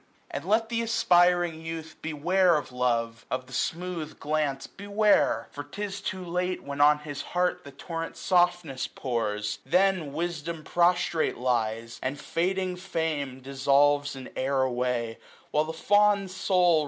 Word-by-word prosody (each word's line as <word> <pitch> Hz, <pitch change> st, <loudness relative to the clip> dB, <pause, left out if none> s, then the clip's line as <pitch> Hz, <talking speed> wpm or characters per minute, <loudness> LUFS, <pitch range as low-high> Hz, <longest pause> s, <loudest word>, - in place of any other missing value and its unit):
And -, -, -5 dB
let 220 Hz, +3 st, +2 dB
th* 230 Hz, -1 st, 0 dB
aspiring 175 Hz, -6 st, +3 dB
youth 165 Hz, 0 st, -6 dB
beware 170 Hz, +4 st, +2 dB
of 145 Hz, -3 st, -5 dB
love, 115 Hz, -2 st, 0 dB
980 -, -, +1 dB
Of 130 Hz, -, -18 dB
the 130 Hz, -, -14 dB
smooth 165 Hz, +1 st, -3 dB
glance 145 Hz, -3 st, -1 dB
beware; 200 Hz, -, +2 dB
for 145 Hz, -, -6 dB
'tis 195 Hz, +6 st, -5 dB
too 185 Hz, -2 st, -4 dB
late. 180 Hz, +1 st, -2 dB
When 140 Hz, 0 st, -3 dB
on 150 Hz, +1 st, +6 dB
his 150 Hz, -1 st, -6 dB, 0.2 s
heart 180 Hz, 0 st, +1 dB
the 140 Hz, -, -10 dB
torrent 165 Hz, +4 st, -6 dB
softness 175 Hz, -7 st, +1 dB
pours; 105 Hz, -4 st, -2 dB
Then 180 Hz, 0 st, +2 dB
wisdom 165 Hz, 0 st, -3 dB
prostrate 175 Hz, -1 st, +2 dB
lies, 115 Hz, -2 st, -1 dB
and 135 Hz, +2 st, -3 dB
fading 185 Hz, +3 st, -1 dB
fame 160 Hz, -8 st, -3 dB
Dissolves 140 Hz, +2 st, +2 dB
in 130 Hz, -1 st, -9 dB
air 135 Hz, 0 st, +1 dB
away; 125 Hz, -2 st, -1 dB, 0.3 s
while 150 Hz, +1 st, +2 dB
the 160 Hz, -, -4 dB
fond 200 Hz, +3 st, +3 dB
soul. 180 Hz, -3 st, +3 dB
160 Hz, 145 wpm, -27 LUFS, 135-180 Hz, 0.3 s, on